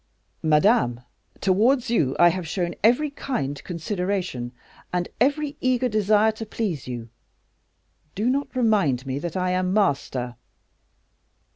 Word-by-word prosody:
"Madame, 155 Hz, -, +3 dB, 0.4 s
towards 230 Hz, +6 st, +3 dB
you 140 Hz, -, +2 dB
I 175 Hz, -, +7 dB
have 180 Hz, -1 st, -3 dB
shown 175 Hz, 0 st, -2 dB
every 250 Hz, +7 st, +4 dB
kind 145 Hz, -, -3 dB
consideration, 180 Hz, -, -3 dB, 0.4 s
and 175 Hz, -1 st, -1 dB
every 290 Hz, +4 st, +1 dB
eager 255 Hz, 0 st, +2 dB
desire 215 Hz, 0 st, +3 dB
to 220 Hz, +1 st, -7 dB
please 200 Hz, -, -3 dB
you; 120 Hz, -2 st, -6 dB, 1.1 s
do 215 Hz, +4 st, 0 dB
not 275 Hz, +2 st, -1 dB
remind 200 Hz, -, +2 dB
me 135 Hz, +1 st, -3 dB
that 170 Hz, +3 st, -4 dB
I 180 Hz, 0 st, 0 dB
am 185 Hz, 0 st, 0 dB
master." 135 Hz, -, 0 dB
185 Hz, 125 wpm, -24 LUFS, 150-230 Hz, 1.1 s, I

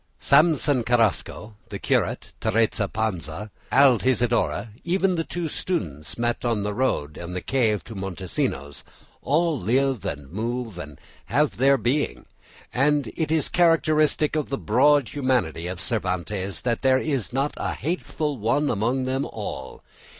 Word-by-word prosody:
Samson 145 Hz, -2 st, +4 dB
Carrasco, 115 Hz, -2 st, 0 dB
the -, -, -5 dB
curate, -, -, -1 dB
Teresa 110 Hz, -1 st, +1 dB
Panza, 105 Hz, -2 st, -3 dB, 0.2 s
Altisidora, 120 Hz, -4 st, +3 dB
even 185 Hz, +2 st, +1 dB
the 165 Hz, -2 st, 0 dB
two 170 Hz, 0 st, -4 dB
students 80 Hz, -, -3 dB
met 120 Hz, 0 st, -1 dB
on 115 Hz, -4 st, 0 dB
the 105 Hz, 0 st, -2 dB
road 100 Hz, -, 0 dB
to 85 Hz, -, -7 dB
the 90 Hz, +1 st, -4 dB
cave 110 Hz, -3 st, +1 dB
of 115 Hz, -, -9 dB
Montesinos, 90 Hz, -6 st, -3 dB, 0.4 s
all 155 Hz, +1 st, +1 dB
live 130 Hz, +1 st, +1 dB
and 75 Hz, -7 st, -5 dB
move 115 Hz, 0 st, -3 dB
and 75 Hz, -4 st, -9 dB, 0.3 s
have 145 Hz, +4 st, +1 dB
their 135 Hz, +3 st, +4 dB
being; 130 Hz, +6 st, -1 dB, 0.5 s
and 145 Hz, -1 st, +2 dB
it 155 Hz, -2 st, -1 dB
is 160 Hz, -2 st, +2 dB
characteristic 155 Hz, -3 st, +3 dB
of 155 Hz, -2 st, -1 dB
the 135 Hz, -, -1 dB
broad 135 Hz, +4 st, +3 dB
humanity 125 Hz, -, 0 dB
of 90 Hz, -1 st, -5 dB
Cervantes 95 Hz, -2 st, -2 dB
that 120 Hz, -2 st, 0 dB
there 130 Hz, -1 st, +4 dB
is 135 Hz, -4 st, -1 dB
not 135 Hz, +3 st, 0 dB
a -, -, -2 dB
hateful 155 Hz, -4 st, -3 dB
one 145 Hz, +8 st, +1 dB
among 120 Hz, +5 st, 0 dB
them 130 Hz, +1 st, -1 dB
all. 65 Hz, -, -6 dB
120 Hz, 145 wpm, -24 LUFS, 100-145 Hz, 0.5 s, Samson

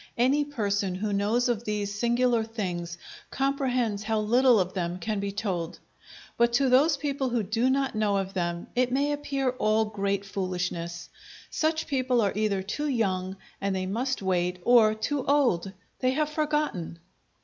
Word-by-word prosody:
Any 265 Hz, +5 st, +3 dB
person 205 Hz, -8 st, -1 dB
who 205 Hz, +2 st, -2 dB
knows 215 Hz, +5 st, +1 dB
of 235 Hz, -2 st, -1 dB
these 210 Hz, -2 st, -2 dB
singular 235 Hz, +2 st, +2 dB
things 180 Hz, -6 st, -4 dB, 0.3 s
comprehends 255 Hz, -6 st, 0 dB
how 220 Hz, +1 st, 0 dB
little 240 Hz, +2 st, +4 dB
of 185 Hz, 0 st, -1 dB
them 175 Hz, -2 st, -2 dB
can 210 Hz, +3 st, -2 dB
be 200 Hz, 0 st, -2 dB
told; 185 Hz, -5 st, -3 dB, 0.6 s
but 235 Hz, 0 st, +3 dB
to 270 Hz, +2 st, +3 dB
those 285 Hz, +4 st, +4 dB
people 275 Hz, -2 st, -1 dB
who 235 Hz, -2 st, 0 dB
do 225 Hz, +6 st, +1 dB
not 270 Hz, 0 st, +1 dB
know 210 Hz, -2 st, +1 dB
of 195 Hz, 0 st, -3 dB
them, 175 Hz, -2 st, -2 dB
it 250 Hz, 0 st, +2 dB
may 280 Hz, +3 st, +1 dB
appear 275 Hz, -3 st, -1 dB
all 220 Hz, -3 st, +1 dB
great 200 Hz, -2 st, -2 dB
foolishness. 180 Hz, -3 st, -4 dB, 0.4 s
Such 315 Hz, 0 st, 0 dB
people 255 Hz, -3 st, +1 dB
are 200 Hz, -3 st, +1 dB
either 205 Hz, -3 st, 0 dB
too 295 Hz, +10 st, -3 dB
young, 190 Hz, -7 st, -1 dB, 0.2 s
and 195 Hz, -1 st, 0 dB
they 185 Hz, 0 st, -2 dB
must 235 Hz, +4 st, -2 dB
wait, 180 Hz, -1 st, 0 dB
or 225 Hz, -2 st, +5 dB
too 265 Hz, +5 st, -2 dB
old 250 Hz, -11 st, +2 dB, 0.3 s
they 255 Hz, -, +2 dB
have 300 Hz, +1 st, 0 dB
forgotten! 300 Hz, -, -1 dB
220 Hz, 165 wpm, -27 LUFS, 195-260 Hz, 0.6 s, or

